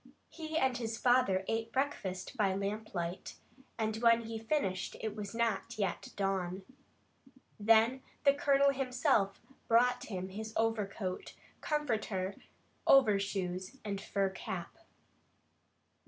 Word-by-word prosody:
He 315 -1 -4
and 265 -5 +2
his 225 -2 -3
father 245 -7 +3
ate 225 0 -1
breakfast 240 -8 -2
by 200 -5 +2
lamplight, 195 -3 -3 0.4
and 220 -1 -1
when 230 0 +5
he 225 0 -5
finished 220 -7 -1
it 215 -1 -3
was 210 0 -6
not 230 0 -1
yet 195 -4 -2
dawn. 190 -1 -1 1.0
Then 225 +4 +4 0.2
the 280 -1 +6
Colonel 280 -1 +4
himself 255 -6 +1 0.3
brought 245 +2 +3
him 185 -3 -4
his 220 +3 -6
overcoat, 210 -4 -2 0.3
comforter, 220 -10 -1 0.5
overshoes, 195 -6 +3
and 200 -1 -3
fur 195 -1 0
cap. 185 -2 -6
220 Hz, 110 wpm, -33 LUFS, 195-245 Hz, 1.0 s, the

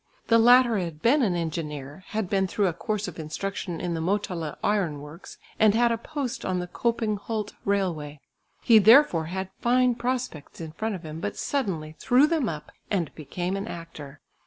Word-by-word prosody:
The 230 0 +6
latter 240 -1 +6
had 165 -4 -5
been 280 +6 +4
an 195 -8 +2
engineer, 150 -2 -4
had 220 -3 -2
been 190 0 +1
through 200 +2 0
a 180 - +1
course 210 +4 -3
of 175 - -8
instruction 170 +2 -4
in 175 -1 -2
the 165 - -2
Motala 175 -4 -2
iron 185 -8 +1
works, 150 +5 -11 0.2
and 215 -1 +5
had 235 +1 +4
a 230 - +1
post 270 -1 -4
on 185 -1 -1
the 180 - -2
Köping 220 +2 -1
Hult 215 -1 -4
railway. 170 -7 -1 0.4
He 230 -3 +7
therefore 220 - +6
had 190 +3 -4
fine 250 +1 +3
prospects 245 - -4
in 160 -2 -6
front 215 +6 -3
of 180 - -9
him, 155 +1 -6
but - - -4
suddenly 170 - -2
threw 255 +4 +5
them 305 -6 0
up, 150 -2 -7 0.2
and 180 -7 -1
became 175 +5 -4
an 195 +2 -4
actor. 155 -6 -9
190 Hz, 185 wpm, -26 LUFS, 165-230 Hz, 0.4 s, He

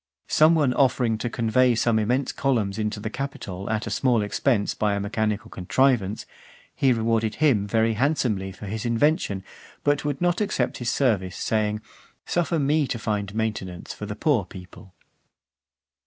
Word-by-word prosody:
Some 155 +2 +5
one 145 -5 +2
offering 125 -4 +2
to 120 - -2
convey 120 +2 +2
some 115 -1 +2
immense 125 +6 0
columns 110 -7 0
into 105 0 -2
the 110 +1 -5
Capitol 135 -9 -5
at 110 -1 -1
a 115 - -5
small 120 -2 +2
expense 105 +1 0
by 105 -1 0
a - - -1
mechanical 110 +2 -2
contrivance, 110 +1 +1 0.5
he 135 - +2
rewarded 115 -1 +1
him 125 -10 +2
very 110 +2 +2
handsomely 110 -6 0
for 95 - -10
his 105 +2 -4
invention, 115 - +1 0.4
but 145 0 +1
would 145 -2 -2
not 175 +2 +1
accept 210 - -1
his 120 -2 -1
service, 105 -9 0
saying, 105 -1 0 0.4
"Suffer 175 -1 0
me 145 0 +2
to 115 - -2
find 105 -2 -3
maintenance 100 -5 -3
for 105 - -7
the 105 - -5
poor 125 -1 +2
people." 90 +1 -13
110 Hz, 160 wpm, -24 LUFS, 105-135 Hz, 0.5 s, Some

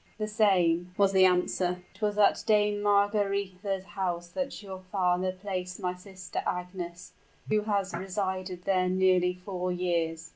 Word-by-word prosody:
"The 215 -1 -2
same," 180 -5 +2
was 200 -1 +4
the 190 -1 +6
answer. 180 0 +1
"It 190 - -21
was 210 -1 0
at 210 - +4
Dame 210 -1 +3
Margaretha's 200 -2 +1
house 175 -3 -3
that 275 +1 -4
your 190 -2 -7
father 185 -1 +1
placed 185 -1 -5
my 180 -2 -1
sister 185 0 -6
Agnes, 180 -1 -5 0.4
who 215 0 +3
has 200 -3 0
resided 185 0 -3
there 185 -1 +2
nearly 185 -1 +3
four 180 0 -4
years." 165 -2 -1
185 Hz, 145 wpm, -29 LUFS, 180-200 Hz, 0.4 s, the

